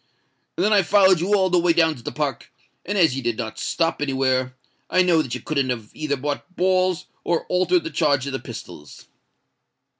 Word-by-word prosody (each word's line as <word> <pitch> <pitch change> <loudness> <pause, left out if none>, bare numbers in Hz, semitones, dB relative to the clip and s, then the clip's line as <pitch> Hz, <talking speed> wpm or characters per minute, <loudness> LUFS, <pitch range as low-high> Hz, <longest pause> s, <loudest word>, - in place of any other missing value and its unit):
Then 210 - +2
I 205 - +5
followed 190 -1 +4
you 195 +5 +1
all 190 -2 +2
the 180 - +4
way 170 0 +3
down 160 -1 +3
to 125 - -13
the - - -5
Park; 140 -7 -4 0.4
and 205 +2 -1
as 160 -8 +4
you 135 - -3
did 120 -2 -2
not 110 0 -5
stop 165 -3 -1
anywhere, 130 -2 0 0.3
I 185 - +3
know 170 -3 +3
that 130 -5 -4
you 125 - -7
couldn't 140 -2 -1
have 115 -4 -4
either 150 -2 -2
bought 145 +6 -5
balls 185 -1 +1 0.2
or 170 -1 -1
altered 185 - +2
the 325 - -5
charge 145 -5 +1
of 140 - -5
the 135 - -2
pistols." 75 -1 -11
155 Hz, 205 wpm, -22 LUFS, 130-185 Hz, 0.4 s, I